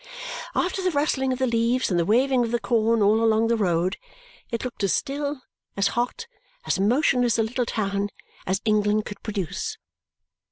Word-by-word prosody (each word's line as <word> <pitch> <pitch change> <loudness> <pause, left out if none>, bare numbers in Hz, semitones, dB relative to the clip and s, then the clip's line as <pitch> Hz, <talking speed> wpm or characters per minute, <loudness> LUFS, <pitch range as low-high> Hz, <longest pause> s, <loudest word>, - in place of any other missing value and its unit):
After 365 +2 0
the 370 - +1
rustling 285 -4 0
of 255 - -1
the 260 - +1
leaves 235 0 +1
and 175 - +2
the 170 - +1
waving 255 +3 +3
of 230 - -2
the 240 +1 0
corn 230 -2 +2
all 215 +3 +4
along 225 0 +3
the 235 - +3
road, 180 -3 +1 0.5
it 230 +1 -3
looked 245 -4 -5
as 195 - +2
still, 285 -1 -2 0.3
as 195 0 +3
hot, 245 - -2 0.4
as - - 0
motionless 245 +2 +3
a 225 - +3
little 240 +2 -2
town 200 -2 -1 0.4
as 190 +1 0
England 210 0 +2
could 205 -1 -8
produce. 200 -7 -4
230 Hz, 175 wpm, -24 LUFS, 205-255 Hz, 0.5 s, all